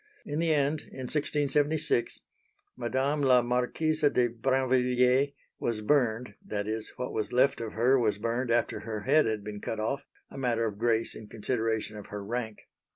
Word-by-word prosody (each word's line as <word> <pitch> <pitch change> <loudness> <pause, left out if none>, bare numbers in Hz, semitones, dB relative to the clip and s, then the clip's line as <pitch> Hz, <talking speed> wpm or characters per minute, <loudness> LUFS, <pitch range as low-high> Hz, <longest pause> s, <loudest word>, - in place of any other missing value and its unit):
In 145 +2 -3
the 165 -1 +2
end, 145 0 +2
in 130 - -10
1676, 145 -1 +1 0.5
Madame 130 +4 0
la 130 -3 +5
Marquise 125 +6 0
de 125 -3 +2
Brinvilliers 130 +2 +2 0.3
was 115 -2 -1
burned 120 -2 +1
that 105 -1 -3
is, 110 0 -3
what 125 0 -4
was 110 - -2
left 130 +1 +3
of 115 -2 -5
her 125 +4 +3
was 110 -4 +1
burned 115 +3 -1
after 120 0 +1
her 110 -2 -5
head 145 +4 +4
had 110 -2 -2
been 105 0 -7
cut 110 - -4
off, 135 +6 -2 0.2
a - - -8
matter 120 -3 +1
of 105 -2 -4
grace 115 -1 +1
in 110 - -10
consideration 110 -1 -2
of 105 - -9
her 100 -1 -6
rank. 110 -1 -4
125 Hz, 170 wpm, -29 LUFS, 110-135 Hz, 0.5 s, la